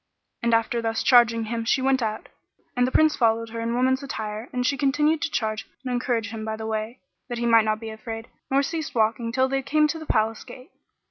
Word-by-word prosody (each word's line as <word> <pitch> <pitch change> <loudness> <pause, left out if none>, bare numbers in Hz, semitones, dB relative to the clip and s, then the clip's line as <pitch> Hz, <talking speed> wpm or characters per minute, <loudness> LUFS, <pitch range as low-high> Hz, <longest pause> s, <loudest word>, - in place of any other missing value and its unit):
And 235 0 +3
after 230 +1 0
thus 225 -1 -1
charging 235 -2 +5
him 230 +1 -3
she 230 - +2
went 265 0 +2
out, 215 -1 -3 0.5
and 245 0 +2
the - - -3
Prince 310 +1 +4
followed 230 -1 +1
her 230 +1 -6
in 230 +1 -1
woman's 260 +2 +2
attire 220 -4 -5
and 250 0 -1
she 275 - +2
continued 295 +3 +2
to - - -1
charge 220 -5 -2 0.2
and 250 - -2
encourage 240 -3 -1
him 220 -1 -6
by 220 0 -3
the 220 0 -6
way, 220 +2 -3 0.3
that 240 - -3
he 235 - -2
might 230 -2 +5
not 215 0 0
be 225 -1 -6
afraid; 225 +1 -7 0.2
nor 275 +1 +3
ceased 320 -1 -4
they - - +1
walking 225 +1 +1
till 260 +2 +2
they 270 0 -1
came 305 +3 +2
to 320 - -3
the 315 - -10
Palace 220 +1 0
gate. 255 +6 -13
235 Hz, 240 wpm, -24 LUFS, 225-260 Hz, 0.5 s, charging